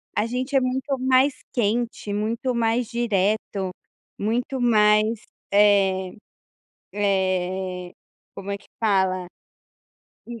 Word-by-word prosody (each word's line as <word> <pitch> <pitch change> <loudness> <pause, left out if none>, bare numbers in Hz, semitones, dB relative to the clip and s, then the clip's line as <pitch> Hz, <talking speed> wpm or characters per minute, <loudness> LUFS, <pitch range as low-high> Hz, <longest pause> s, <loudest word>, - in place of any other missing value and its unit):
A 210 - +1
gente 255 +4 -3
é - - +7
muito 265 +2 -1
mais 260 +2 +3 0.2
quente, 230 -2 -1
muito 230 +5 -1
mais 230 0 +1
direto, 205 -4 -1 0.5
muito 245 +5 -1
mais, 215 -1 +3 0.3
eh 195 -2 +3 0.8
eh, 185 -2 -1 0.4
como 195 0 -6
é 200 - -2
que - - -23
fala? 190 -4 +1 1.0
Hum. 235 -1 -8
210 Hz, 105 wpm, -23 LUFS, 195-240 Hz, 1.0 s, é